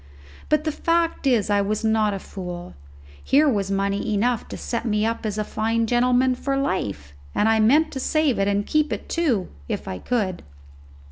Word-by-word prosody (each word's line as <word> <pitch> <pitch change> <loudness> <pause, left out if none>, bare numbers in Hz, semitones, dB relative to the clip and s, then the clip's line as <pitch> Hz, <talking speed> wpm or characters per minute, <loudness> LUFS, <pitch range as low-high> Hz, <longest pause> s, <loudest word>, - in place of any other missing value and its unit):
But 305 0 +2
the 310 - 0
fact 335 -1 0
is 225 -5 +2
I 205 0 +3
was 210 +2 -1
not 220 -1 +2
a 200 - -3
fool. 180 -2 -7 0.5
Here 295 +3 +4
was 200 -7 0
money 200 +2 0
enough 235 +2 0
to - - -7
set 235 -1 -3
me 210 -2 +1
up 230 0 -2
as 210 0 -3
a 215 - 0
fine 225 +2 0
gentleman 250 +2 +3
for 275 +2 -2
life, 100 - -2 0.2
and 210 - +2
I 225 0 +3
meant 295 +9 +4
to 265 - -5
save 310 -3 +1
it 195 - +2
and 205 0 +1
keep 305 0 +1
it - - -4
too, 265 - 0 0.2
if - - -3
I 95 - -4
could. 205 -7 -1
225 Hz, 195 wpm, -23 LUFS, 200-265 Hz, 0.5 s, Here